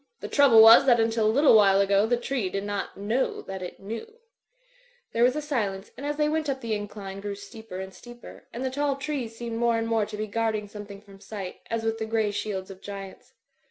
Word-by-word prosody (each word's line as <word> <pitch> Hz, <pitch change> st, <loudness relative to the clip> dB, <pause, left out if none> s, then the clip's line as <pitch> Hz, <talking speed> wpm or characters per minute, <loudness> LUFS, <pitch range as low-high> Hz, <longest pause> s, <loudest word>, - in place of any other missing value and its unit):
"The -, -, -6 dB
trouble 255 Hz, -6 st, +7 dB
was 225 Hz, +4 st, +9 dB
that 240 Hz, -2 st, +5 dB
until 225 Hz, -1 st, +2 dB
a -, -, +4 dB
little 280 Hz, 0 st, +5 dB
while 195 Hz, -2 st, +6 dB
ago 200 Hz, +1 st, +3 dB
the 240 Hz, +1 st, +2 dB
tree 245 Hz, -5 st, -2 dB
did 195 Hz, +1 st, -3 dB
not 205 Hz, 0 st, -4 dB
know 220 Hz, +6 st, -1 dB
that 190 Hz, -1 st, -7 dB
it 180 Hz, -, -7 dB
knew/' 230 Hz, -, -7 dB, 1.0 s
There 230 Hz, -, 0 dB
was 250 Hz, +2 st, +4 dB
a 300 Hz, -, -3 dB
silence; 210 Hz, -9 st, -2 dB
and 285 Hz, -, -6 dB
as 295 Hz, 0 st, -2 dB
they 300 Hz, 0 st, +2 dB
went 310 Hz, -1 st, -1 dB
up 265 Hz, -1 st, -2 dB
the 230 Hz, -2 st, -2 dB
in 205 Hz, -1 st, -3 dB
cline 195 Hz, -1 st, -8 dB
grew 200 Hz, 0 st, -4 dB
steeper 200 Hz, -1 st, -9 dB
and 190 Hz, 0 st, -7 dB
steeper, 240 Hz, +3 st, -13 dB
and 250 Hz, +3 st, -5 dB
the 260 Hz, -, -1 dB
tall 285 Hz, +1 st, 0 dB
trees 275 Hz, -5 st, -4 dB
seemed 230 Hz, -1 st, -5 dB
more 235 Hz, -1 st, +2 dB
and 225 Hz, 0 st, -2 dB
more 225 Hz, -2 st, +1 dB
to 215 Hz, -, -7 dB
be 215 Hz, -, -2 dB
guarding 215 Hz, 0 st, -1 dB
something 205 Hz, -1 st, -10 dB
from 200 Hz, -2 st, -16 dB
sight, 195 Hz, -2 st, -7 dB
as 230 Hz, -1 st, -2 dB
with 225 Hz, 0 st, -1 dB
the 220 Hz, -, -3 dB
grey 220 Hz, -2 st, 0 dB
shields 195 Hz, -2 st, -4 dB
of 190 Hz, 0 st, -12 dB
giants. 195 Hz, -1 st, -9 dB
220 Hz, 235 wpm, -26 LUFS, 200-240 Hz, 1.0 s, was